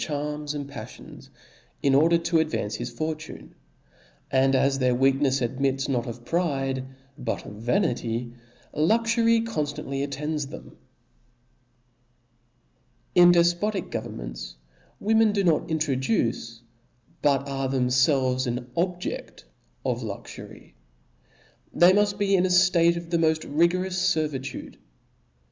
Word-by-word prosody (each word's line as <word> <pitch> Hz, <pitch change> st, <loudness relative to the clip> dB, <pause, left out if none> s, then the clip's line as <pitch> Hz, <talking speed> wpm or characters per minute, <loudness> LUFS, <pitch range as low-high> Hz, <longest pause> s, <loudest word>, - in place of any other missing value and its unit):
'9, -, -, -5 dB
charms 150 Hz, 0 st, -3 dB
and 145 Hz, -1 st, -4 dB
paflions, 140 Hz, 0 st, -11 dB, 0.5 s
in 140 Hz, -, +3 dB
order 165 Hz, +5 st, +5 dB
to 170 Hz, 0 st, 0 dB
ad^^ance 155 Hz, -10 st, -1 dB
his 120 Hz, +1 st, -4 dB
for 155 Hz, +7 st, -2 dB
tune: 155 Hz, 0 st, -11 dB, 0.8 s
and 135 Hz, 0 st, +3 dB
as 135 Hz, +1 st, +2 dB
their 125 Hz, -1 st, +2 dB
weaknefs 135 Hz, 0 st, +2 dB
admits 135 Hz, +2 st, -1 dB
not 125 Hz, -4 st, -1 dB
of 120 Hz, 0 st, -8 dB
pride, 135 Hz, -6 st, -1 dB, 0.4 s
but 115 Hz, -2 st, -3 dB
of -, -, -8 dB
vanity, 120 Hz, -, -1 dB, 0.4 s
luxury 230 Hz, -, +3 dB
conftantly 145 Hz, -10 st, -3 dB
attends 150 Hz, +1 st, -3 dB
them. -, -, -11 dB, 2.4 s
In 175 Hz, 0 st, +7 dB
defpotic 175 Hz, +3 st, +1 dB
governments -, -, -6 dB, 0.4 s
women 220 Hz, 0 st, +3 dB
do 200 Hz, -1 st, +1 dB
not 170 Hz, -3 st, +2 dB
intro 160 Hz, -3 st, 0 dB
duce, 120 Hz, -, -1 dB, 0.6 s
but 140 Hz, -1 st, +2 dB
are 135 Hz, -1 st, -2 dB
themfelves 130 Hz, 0 st, +2 dB
an 125 Hz, +1 st, -4 dB
objedt 180 Hz, +1 st, -3 dB, 0.4 s
of, -, -, -1 dB
luxury. -, -, -9 dB, 1.0 s
They 175 Hz, +1 st, +7 dB
muft 205 Hz, 0 st, +2 dB
be 200 Hz, -1 st, +2 dB
in 185 Hz, 0 st, +3 dB
a -, -, -3 dB
ftate 180 Hz, -2 st, +4 dB
of 170 Hz, 0 st, -8 dB
the 170 Hz, -, +2 dB
moft 160 Hz, -1 st, +1 dB
rigorous 180 Hz, +4 st, +1 dB
fer 155 Hz, -1 st, +1 dB
vitude. 135 Hz, -2 st, -7 dB
150 Hz, 125 wpm, -25 LUFS, 130-175 Hz, 2.4 s, In